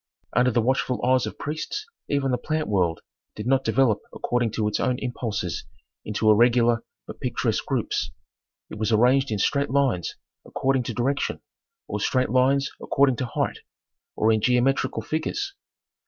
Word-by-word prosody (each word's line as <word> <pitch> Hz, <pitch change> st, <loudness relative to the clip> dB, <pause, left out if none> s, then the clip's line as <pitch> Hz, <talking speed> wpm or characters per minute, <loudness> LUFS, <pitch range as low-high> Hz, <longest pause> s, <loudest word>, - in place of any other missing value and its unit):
Under 125 Hz, +2 st, +4 dB
the 120 Hz, -1 st, +1 dB
watchful 130 Hz, 0 st, +1 dB
eyes 130 Hz, 0 st, +3 dB
of -, -, -7 dB
priests 155 Hz, -, -4 dB, 0.2 s
even 140 Hz, -2 st, +1 dB
the 125 Hz, -, 0 dB
plant 155 Hz, +3 st, -2 dB
world 90 Hz, -5 st, +1 dB, 0.3 s
did 105 Hz, -, -6 dB
not 135 Hz, +1 st, +2 dB
develop 130 Hz, -6 st, +2 dB
according 120 Hz, -1 st, 0 dB
to 110 Hz, -1 st, 0 dB
its 105 Hz, -, -1 dB
own 125 Hz, -1 st, +1 dB
impulses 115 Hz, -8 st, -3 dB, 0.4 s
into 110 Hz, +1 st, +2 dB
irregular 120 Hz, +1 st, +4 dB, 0.2 s
but -, -, -10 dB
picturesque -, -, -1 dB
groups; -, -, -1 dB, 0.6 s
it 105 Hz, -, -7 dB
was 110 Hz, +1 st, 0 dB
arranged 125 Hz, +5 st, +4 dB
in 105 Hz, -, -1 dB
straight 140 Hz, +7 st, +1 dB
lines 130 Hz, -, +1 dB, 0.3 s
according 135 Hz, -1 st, 0 dB
to 120 Hz, -, -5 dB
direction, 135 Hz, +4 st, 0 dB, 0.5 s
or -, -, -3 dB
straight 130 Hz, -3 st, +1 dB
lines 135 Hz, +2 st, +3 dB
according 135 Hz, -3 st, +2 dB
to 130 Hz, -, -2 dB
height, -, -, -2 dB, 0.6 s
or 110 Hz, +1 st, +3 dB
in 110 Hz, -1 st, +2 dB
geometrical 125 Hz, +3 st, +1 dB
figures. 390 Hz, -, -2 dB
125 Hz, 155 wpm, -25 LUFS, 110-135 Hz, 0.6 s, Under